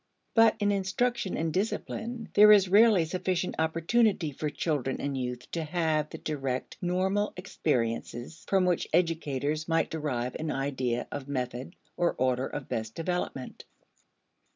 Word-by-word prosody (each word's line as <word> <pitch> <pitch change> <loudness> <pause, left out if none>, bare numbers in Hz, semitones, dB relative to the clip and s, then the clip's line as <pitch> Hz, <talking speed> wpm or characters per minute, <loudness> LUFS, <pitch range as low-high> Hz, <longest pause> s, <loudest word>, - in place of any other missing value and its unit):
But 225 -1 +6
in 205 0 +2
instruction 200 +2 0
and 160 -1 -1
discipline, 225 +3 -3
there 210 +1 +8
is 200 -2 +7
rarely 205 -2 +6
sufficient 180 +1 -1
opportunity 165 +2 +2
for 150 +2 -3
children 145 -4 -2
and 140 -1 -2
youth 125 -1 -4
to 165 - -2
have 155 -2 0
the - - -7
direct 135 -4 -3
normal 190 +3 0
experiences 125 - -2
from 190 -2 +3
which 180 -2 +1
educators 155 -3 0
might 165 -1 +1
derive 130 -6 -2
an 160 0 -3
idea 130 -4 -1
of 145 -1 -5
method 130 +3 -4 0.2
or 175 -1 +1
order 130 0 +1
of 145 - -6
best 110 0 -4
development. 165 -6 -4
160 Hz, 140 wpm, -29 LUFS, 135-185 Hz, 0.2 s, there